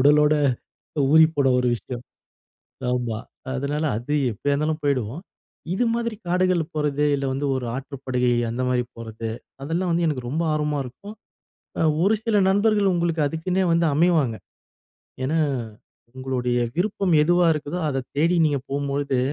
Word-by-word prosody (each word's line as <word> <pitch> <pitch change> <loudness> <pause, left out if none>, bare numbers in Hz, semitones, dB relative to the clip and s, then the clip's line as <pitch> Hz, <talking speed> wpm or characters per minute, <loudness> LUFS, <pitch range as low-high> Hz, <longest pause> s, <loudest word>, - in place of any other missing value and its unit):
உடலோட 150 +2 +5 0.8
ஊறிப்போன 155 -3 +5
ஒரு 125 - +1
விஷயம். 120 +1 -8 0.9
ஆமா 120 -3 -1 0.4
அதனால 145 +3 -2
அது 125 +7 -3 0.2
எப்டியா 130 +7 -1
இருந்தாலும் 155 +2 0
போய்டுவோம். 130 +1 -1 0.5
இது 245 +6 +1
மாதிரி 235 -1 -2
காடுகள் 180 0 +2
போறது 150 -1 0
இல்ல 140 -1 -2
வந்து 140 +2 -2
ஒரு 130 -1 -2
ஆற்றுப்படுகை, 130 -2 -2 0.2
அந்த 120 +2 -2
மாரி 125 -1 +1
போறது 115 0 -6 0.3
அதெல்லாம் 170 +5 -1
வந்து 170 +1 +1
எனக்கு 130 -6 -2
ரொம்ப 160 +6 -1
ஆர்வமா 150 -1 0
இருக்கும். 165 - -10 0.9
ஒரு 205 +4 +4
சில 225 -2 +2
நண்பர்கள் 205 0 +3
உங்களுக்கு 170 -2 0
அதுக்குன்னே 180 +5 -1
வந்து 170 0 +3
அமைவாங்க. 155 -8 +3 0.9
ஏன்னா, 155 +5 +1 0.8
உங்களுடைய 125 -2 -1 0.2
விருப்பம் 195 0 0
எதுவா 175 +2 +3
இருக்குதோ 150 +3 -4
அத 135 -2 -2
தேடி 165 +4 +3
நீங்க 145 -3 +1
போம்போது 140 -1 -1
150 Hz, 135 wpm, -23 LUFS, 130-170 Hz, 0.9 s, உடலோட